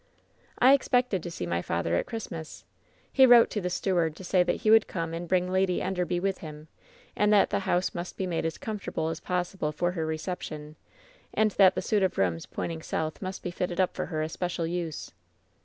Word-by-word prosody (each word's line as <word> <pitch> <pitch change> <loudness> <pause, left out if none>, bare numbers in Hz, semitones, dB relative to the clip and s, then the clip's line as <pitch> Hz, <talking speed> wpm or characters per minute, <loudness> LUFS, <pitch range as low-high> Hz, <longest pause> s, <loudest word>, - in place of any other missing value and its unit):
"I 260 +2 +7
expected 250 -7 +2
to 175 - -6
see 165 - -5
my 85 0 -1
father 85 -1 -2
at - - 0
Christmas. 170 -9 -7 0.5
He 265 -1 +7
wrote 240 -1 +7
to 210 - -2
the 180 - -2
steward 175 -4 0
to 190 - -10
say 185 0 +3
that 180 - 0
he 215 - +3
would 220 -1 +6
come 165 -3 -4
and 170 +1 -5
bring 180 +1 +1
Lady 185 -1 +2
Enderby 180 -1 -1
with 195 +1 -1
him, 155 -1 -10 0.5
and 210 0 +3
that 205 -2 +4
the - - +1
house 180 +1 +1
must 175 +1 -6
be 190 - -1
made 175 -3 -2
as 165 0 -2
comfortable 205 -7 -3
as 165 - -4
possible 180 -3 -2
for 175 +3 -1
her 165 -3 -3
reception; 155 -2 -5 0.6
and 215 -1 +3
that 190 -1 +5
the - - -2
suit 210 -2 +1
of 190 -1 0
rooms 85 -3 0
pointing 165 -1 -4
south 160 0 -3
must 185 -1 -5
be 180 - -3
fitted 175 0 -3
up 185 - +2
for - - -3
her 155 -2 -2
especial 170 +1 -3
use. 170 -2 -4
180 Hz, 210 wpm, -28 LUFS, 160-190 Hz, 0.6 s, I